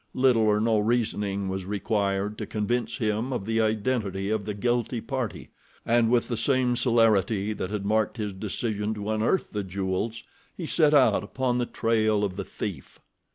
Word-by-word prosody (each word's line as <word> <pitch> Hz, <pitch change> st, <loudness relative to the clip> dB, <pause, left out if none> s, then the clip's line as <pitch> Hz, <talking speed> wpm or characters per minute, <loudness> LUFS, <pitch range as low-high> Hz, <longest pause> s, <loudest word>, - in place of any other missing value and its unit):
Little 125 Hz, -3 st, +4 dB
or 105 Hz, 0 st, +3 dB
no 110 Hz, 0 st, +2 dB
reasoning 105 Hz, -3 st, 0 dB
was 95 Hz, -1 st, -3 dB
required 100 Hz, 0 st, -1 dB
to -, -, -4 dB
convince 115 Hz, +2 st, -1 dB
him 110 Hz, +1 st, -1 dB
of 120 Hz, -6 st, -3 dB
the 115 Hz, +1 st, +1 dB
identity 110 Hz, -3 st, -1 dB
of 110 Hz, -2 st, -1 dB
the 105 Hz, -, -3 dB
guilty 120 Hz, +2 st, 0 dB
party, 130 Hz, -2 st, -4 dB, 0.4 s
and 115 Hz, -1 st, +3 dB
with 120 Hz, -1 st, +2 dB
the 120 Hz, -, -2 dB
same 130 Hz, -1 st, +2 dB
celerity 110 Hz, -4 st, +2 dB
that 95 Hz, -, -4 dB
had 105 Hz, -1 st, -3 dB
marked 110 Hz, +2 st, +1 dB
his 105 Hz, -3 st, -3 dB
decision 105 Hz, +2 st, -3 dB
to 105 Hz, +1 st, -3 dB
unearth 110 Hz, -, 0 dB
the 105 Hz, -1 st, -2 dB
jewels, 95 Hz, +4 st, -3 dB, 0.3 s
he 175 Hz, -, -4 dB
set 155 Hz, -1 st, +3 dB
out 125 Hz, -8 st, +4 dB
upon 125 Hz, +3 st, -1 dB
the 120 Hz, -, -1 dB
trail 110 Hz, -2 st, +1 dB
of 95 Hz, -3 st, -1 dB
the 100 Hz, -, -3 dB
thief. 90 Hz, -10 st, -6 dB
110 Hz, 175 wpm, -26 LUFS, 100-120 Hz, 0.4 s, Little